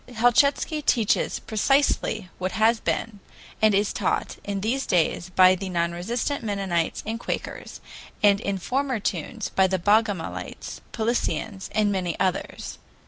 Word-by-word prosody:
Helchitsky 275 +6 +3
teaches 230 -7 +2
precisely 220 -4 +1
what 185 0 -2
has 225 +1 +3
been 220 -3 -2 0.4
and 215 -2 +5
is 205 +1 +1
taught - - -1
in 200 -1 -3
these 250 +6 -1
days 175 0 +1
by 185 0 +6
the 190 +1 -4
non 170 -1 0
resistant 235 +11 -2
Mennonites 195 -6 -1
and 225 +1 -3
Quakers, - - -5 0.4
and 200 -1 +5
in 200 -1 -1
former 260 +5 -1
tunes 200 +4 -3
by 190 0 +3
the 190 0 0
Bogomilites, 205 -1 -1
Paulicians, 220 -3 -2
and 210 -1 +3
many 180 -4 -2
others. 185 0 -2
205 Hz, 140 wpm, -25 LUFS, 185-230 Hz, 0.4 s, by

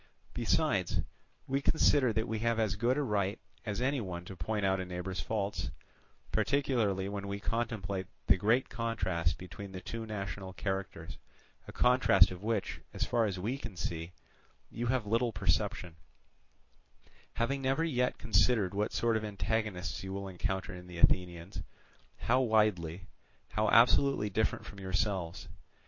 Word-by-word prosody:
Besides, - - +1 0.4
we 135 +1 0
consider 140 -4 +4
that 110 +1 0
we 110 -1 -2
have 115 0 +1
as 110 -3 +2
good 120 +5 +1
a 145 - +1
right 100 -5 0 0.3
as 105 0 -2
any 135 0 +1
one 90 -4 -5
to 95 - -8
point 100 +5 -1
out 95 0 +2
a 95 - -2
neighbour's 90 +1 -4
faults, 105 -2 -2 0.6
particularly 115 -9 +1
when 100 0 -4
we 100 0 -3
contemplate 100 -4 -2 0.2
the 90 - +6
great 110 +7 +2
contrast 95 -9 -1
between 95 +2 -9
the 95 - -5
two 115 +4 -6
national 95 -2 -5
characters; 95 -3 -4 0.5
a - - -7
contrast 125 -7 +5
of 90 0 -7
which, 110 -1 -2
as - - 0
far 120 -2 +2
as 100 -3 -2
we 115 +9 -2
can 115 -8 -8
see, 85 0 -3 0.6
you 120 +2 -3
have 125 -2 +1
little 115 +3 +1
perception, 95 -2 0 1.4
having 135 +4 0
never 135 +4 +1
yet 125 -6 +1
considered 105 -2 +3
what 105 +1 -1
sort 115 -1 +2
of 110 - 0
antagonists 105 -3 -2
you 95 - -5
will 100 0 -4
encounter 95 +1 -3
in 90 0 -9
the 90 -1 -9
Athenians, 90 +1 +2 0.6
how 125 +3 +3
widely, 100 -7 +2 0.4
how 110 0 +1
absolutely 120 -2 +5
different 110 +3 0
from 100 - -10
yourselves. 95 -2 -1
105 Hz, 155 wpm, -32 LUFS, 95-115 Hz, 1.4 s, the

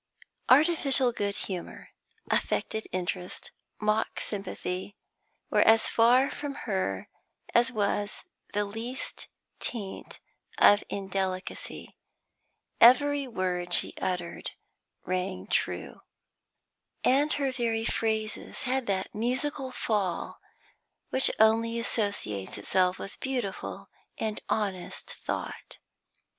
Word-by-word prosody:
Artificial 275 -3 +6
good 200 -3 -2
humour, 185 -3 -6 0.4
affected 220 0 0
interest, 180 0 -3 0.3
mock 215 +1 +1
sympathy, 195 -1 -4 0.5
were - - +5
as 225 0 +6
far 245 +4 +5
from 285 -1 -5
her 185 - -1 0.5
as 240 +2 +4
was 205 -2 -1 0.3
the 205 0 +1
least 225 +5 -5 0.3
taint 205 -5 -6 0.4
of 205 - +7
indelicacy; 190 -1 -4 0.8
every 280 +3 +6
word 180 -5 +1
she - - +4
uttered 180 -2 -2 0.6
rang 185 +1 -2
true, - - -1 1.0
and 285 +4 +4
her 275 -2 0
very 230 -3 -1
phrases 220 -2 -1
had 260 -1 0
that 190 -1 -1
musical 260 +5 -1
fall 205 -8 -1 0.7
which 260 - +4
only 225 +1 +4
associates 200 - -1
itself 180 - +2
with 195 - -8
beautiful 250 -7 -3 0.3
and 215 -1 -2
honest 195 -4 -2
thought. - - -5
215 Hz, 95 wpm, -29 LUFS, 190-250 Hz, 1.0 s, of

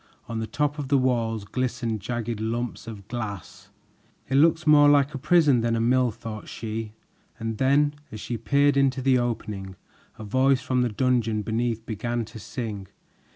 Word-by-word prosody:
On 115 -2 -4
the 110 - -3
top 150 +2 -1
of 140 - -3
the 140 +1 +3
walls 115 -5 0
glistened 120 0 -2
jagged 115 +1 -4
lumps 115 +2 -3
of 105 -3 -9
glass. 110 -7 -6 0.6
"It - - -3
looks 160 +3 +4
more 145 -1 +7
like 140 0 +4
a 135 - -4
prison 150 -5 +4
than 115 0 +1
a - - 0
mill," 125 +2 +3
thought 110 -1 -8
she, 110 -1 -5 0.4
and 115 -2 -4
then 145 +2 +3 0.2
as 110 - -7
she 120 - -4
peered 140 +6 +2
into 135 -1 +2
the 130 -1 +4
opening, 105 -5 -4 0.4
a - - -8
voice 130 +4 +2
from 130 0 +1
the 125 - +1
dungeon 115 -2 0
beneath 115 +1 -2
began 120 +1 -3
to 110 0 -11
sing. 105 -3 -6
120 Hz, 175 wpm, -25 LUFS, 110-135 Hz, 0.6 s, more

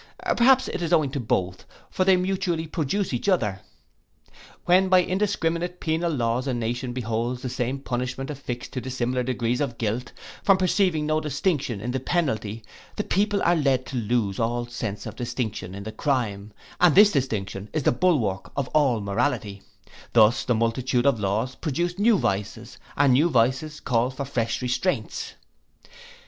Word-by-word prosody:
Perhaps 260 +2 +5
it - - -4
is 170 -1 -2
owing 155 -6 +3
to 140 - -3
both; 95 -6 -1 0.3
for 185 - +1
they 190 -1 +5
mutually 180 -3 -1
produce 160 +3 -2
each 125 +11 -1
other. 105 - +1 1.0
When 185 +2 +4
by 185 -1 +6
indiscriminate 180 -3 -1
penal 165 +1 0
laws 125 -1 -1
a 130 - 0
nation 120 +2 -2
beholds 120 0 -2
the 130 - -2
same 125 +2 -2
punishment 130 +1 -4
affixed 125 -4 -6
to 130 - -3
dissimilar 125 0 -2
degrees 125 0 -1
of 125 -5 -2
guilt, 115 +3 -2 0.3
from 195 -1 +4
perceiving 185 -4 +1
no 155 +1 +1
distinction 140 - -1
in 120 +5 -3
the 130 - -1
penalty, 115 -8 -1 0.3
the 210 - -2
people 205 +1 +1
are 175 - +4
led 135 -5 +1
to 135 - -7
lose 110 -4 0
all 120 +1 0
sense 115 -4 -5
of 110 -1 -7
distinction 110 -6 -4
in 100 - -7
the 110 - -6
crime, 110 -5 -2 0.3
and 175 -4 +5
this 205 +2 +8
distinction 105 - -2
is 155 -2 -1
the - - +4
bulwark 120 - 0
of 140 -3 -1
all 135 -7 +2
morality: 100 -1 -1 0.5
thus 110 0 +5
the 125 - +1
multitude 120 +2 0
of 140 -5 +3
laws 105 +5 -1
produce 175 +7 -2
new 220 0 +4
vices, 100 - -3 0.2
and 140 -2 +5
new 150 +7 +4
vices 130 +4 +1
call 120 -1 +1
for 135 +1 -5
fresh 120 -2 -2
restraints. 125 - -2
130 Hz, 165 wpm, -25 LUFS, 115-165 Hz, 1.0 s, this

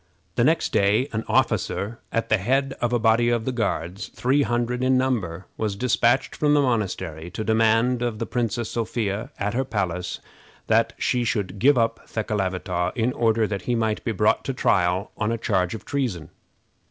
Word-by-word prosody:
The - - +1
next - - +2
day 105 +5 +3
an 110 +1 -1
officer, 110 +4 0
at 115 - -1
the 110 - +3
head 135 +6 +1
of 120 0 +1
a 120 - +3
body 115 +1 +3
of 120 -2 0
the 130 - 0
Guards 100 -5 -2
three 135 +4 +1
hundred 120 -1 0
in 130 0 +3
number, 100 -10 -1
was 105 -3 -1
dispatched 120 +2 +2
from 150 -1 +2
the 145 - +4
monastery 95 - -2
to 110 - -4
demand 115 +3 +2
of 120 -3 -1
the 115 - -3
Princess 120 -1 -2
Sophia, 110 -2 -2
at 105 +1 -2
her 130 +3 +1
palace, 90 -7 -3 0.5
that - - +2
she 125 -1 0
should 100 -4 -2
give 140 +4 +5
up 115 -1 0
Thekelavitaw, 95 -4 -2
in 120 +1 0
order 115 -1 +2
that 100 -3 -3
he 120 - +2
might 110 -2 -1
be 115 - -1
brought 105 0 +2
to 135 - -2
trial 90 -2 +1
on 105 +1 0
a 115 - -1
charge 95 -4 0
of 110 - -9
treason. 120 - -3
115 Hz, 185 wpm, -24 LUFS, 100-120 Hz, 0.5 s, give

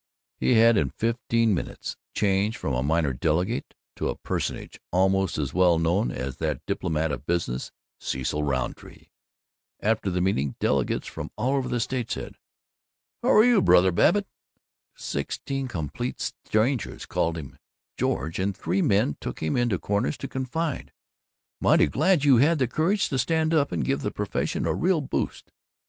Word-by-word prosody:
He 125 - +3
had 115 0 +6
in 70 -8 +2
fifteen 115 - +1
minutes 90 - -4 0.2
changed 100 +3 +1
from 70 - -3
a 60 - 0
minor 75 0 +1
delegate 85 - -1 0.2
to - - -1
a - - -2
personage - - -4
almost 95 0 +2
as 70 -3 -2
well 90 -2 +4
known 85 +7 +1
as 65 +1 -5
that 75 -4 -3
diplomat 80 0 -1
of 70 +1 -6
business, 85 -8 -1 0.3
Cecil 65 +3 -2
Rountree. 65 -4 -4 0.7
After 110 -2 0
the 90 0 -1
meeting, 70 -8 0
delegates 70 -3 0
from - - -6
all 125 +5 0
over 135 -2 -1
the 120 - 0
state 120 0 -2
said, - - -5 0.8
"Hower 215 - +5
you, 240 -4 +5
Brother 95 - +5
Babbitt?" 205 - +3 0.7
Sixteen 135 -1 -3
complete 80 - -4
strangers 115 +3 -1
called 85 0 -1
him 70 -4 -9 0.4
"George," 80 +8 -1
and 95 0 -1
three 90 +4 0
men 100 -8 +2
took - - -5
him 80 -1 -1
into 120 -6 +1
corners 105 - -1
to 135 - -5
confide, 135 +4 -3 0.7
"Mighty - - +5
glad 155 - +2
you 135 -4 +6
had 155 +7 +4
the 130 -3 +1
courage 185 - +1
to 135 - -1
stand 160 +4 +1
up 145 -3 +2
and 80 -7 -1
give 70 +3 0
the - - -1
Profession - - -2
a - - +1
real 180 -2 +1
boost. 135 - -3
100 Hz, 160 wpm, -26 LUFS, 80-130 Hz, 0.8 s, had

